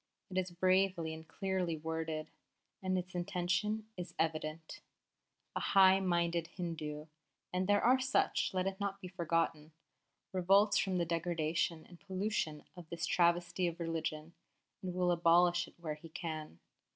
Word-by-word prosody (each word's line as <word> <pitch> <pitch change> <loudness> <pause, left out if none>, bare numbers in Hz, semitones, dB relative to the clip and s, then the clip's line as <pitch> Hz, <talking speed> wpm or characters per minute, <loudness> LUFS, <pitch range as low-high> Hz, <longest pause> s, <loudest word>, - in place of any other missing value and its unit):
It 185 - -3
is 185 0 -2
bravely 185 -2 +2
and 160 0 -10
clearly 185 -4 -1
worded, 160 0 -3 0.5
and 185 -1 0
its 185 +1 -4
intention 185 +4 -1
is 180 -1 -7
evident. 155 0 -2 0.7
The - - -1
high 190 -1 +6
minded 170 -3 +1
Hindu 155 -5 -5 0.5
and 185 +1 0
there 205 0 +3
are 255 +2 +5
such, 260 +1 +2
let 185 -1 0
it 195 0 -2
not 200 -1 -2
be 185 - -7
forgotten 165 -3 -1 0.6
revolts 195 +3 +4
from 190 -2 0
the 170 - +1
degradation 165 -1 -1
and 175 -1 -14
pollution 190 -5 -2
of 175 -3 -11
this 170 -1 -2
travesty 175 +1 +2
of 170 0 -4
religion, 165 -1 -3 0.5
and 180 -1 -4
will 180 -1 +2
abolish 175 +1 +4
it - - -17
where 160 -3 -3
he 150 +2 -11
can. 155 - -5
175 Hz, 150 wpm, -34 LUFS, 160-185 Hz, 0.7 s, high